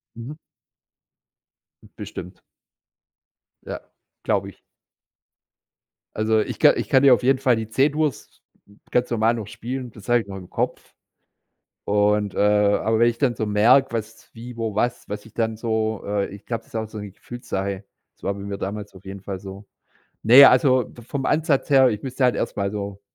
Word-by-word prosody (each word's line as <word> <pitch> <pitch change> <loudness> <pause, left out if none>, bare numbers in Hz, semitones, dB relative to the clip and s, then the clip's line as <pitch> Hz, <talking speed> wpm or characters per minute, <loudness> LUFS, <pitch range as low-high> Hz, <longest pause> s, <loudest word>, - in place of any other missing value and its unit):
Mhm. 120 +6 -8 1.6
Bestimmt. 90 +2 -8 1.2
Ja, - - -5 0.4
glaube - - 0
ich. - - -17 1.6
Also 110 0 +2
ich - - -5
ka - - +6
ich - - -4
kann 130 - +5
dir 135 -2 +8
auf 125 - +1
jeden 130 +1 +3
Fall 130 -3 +3
die 110 -1 -5
C-Dur's 145 +2 0 0.6
ganz 125 - +1
normal 115 -1 +2
noch 110 -4 -5
spielen, 125 +3 -6
das 105 -2 -14
habe 120 -1 +4
ich 100 - -13
noch 95 0 -7
im 90 -2 -11
Kopf. - - -3 0.9
Und, 105 0 +1
äh - - -3
aber 105 +2 +2
wenn 120 - +6
ich 115 - -9
dann 130 -5 +1
so 110 - -3
merke, 120 +6 +4
was 115 0 -6
wie 120 +1 -10
wo 110 -3 -3
was 120 +2 -1
was 105 +1 -6
ich 110 - -17
dann 110 -1 -1
so, 110 -2 -2
äh 100 -1 -1
ich 100 +1 -12
glaube, 115 -2 -3
das - - -26
ist - - -8
auch 110 -1 -3
so 110 - -8
'ne 100 -1 -7
Gefühlssache. 100 -3 -5 0.3
Das - - -36
war 100 - -1
bei 100 - -9
mir 100 0 -5
damals 100 +1 -5
auf 95 0 -15
jeden 95 0 -8
Fall 95 -2 -6
so. 100 +1 -10 0.6
Ne, 125 +5 +9
also 130 -1 +4
v 120 - -13
vom 135 +3 -4
Ansatz 155 -3 +1
her, 135 -2 +6
ich 105 -2 -3
müsste 130 0 -2
halt 125 - +3
erst - - -3
mal 100 -1 -1
so 100 -1 -6
110 Hz, 185 wpm, -23 LUFS, 105-125 Hz, 1.6 s, Ne